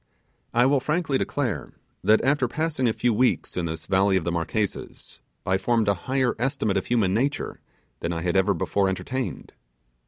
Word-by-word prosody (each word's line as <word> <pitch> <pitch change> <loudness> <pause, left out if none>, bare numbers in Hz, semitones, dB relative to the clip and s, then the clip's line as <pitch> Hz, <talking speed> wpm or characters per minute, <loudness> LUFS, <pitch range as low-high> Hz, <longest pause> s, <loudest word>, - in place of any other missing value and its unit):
I 120 +2 +4
will 140 +1 +4
frankly 150 0 0
declare 115 - -2 0.3
that 110 +1 +4
after 135 -1 +2
passing 150 -1 -1
a - - +2
few 120 +1 +1
weeks 125 +4 +1
in 90 - -1
this 80 0 -5
valley 95 +2 +3
of 90 - -1
the 85 - -1
Marquesas, 90 +5 -3 0.2
I 95 0 +1
formed 115 +2 +1
a 100 - +4 0.2
higher 130 -2 +2
estimate 125 -6 0
of 95 - -2
human 110 -6 +2
nature 135 +7 -1 0.4
than 85 - -2
I 85 -1 -3
had 90 0 0
ever 95 +1 +3
before 95 +4 +1
entertained. 130 +7 -4
110 Hz, 180 wpm, -25 LUFS, 95-130 Hz, 0.4 s, I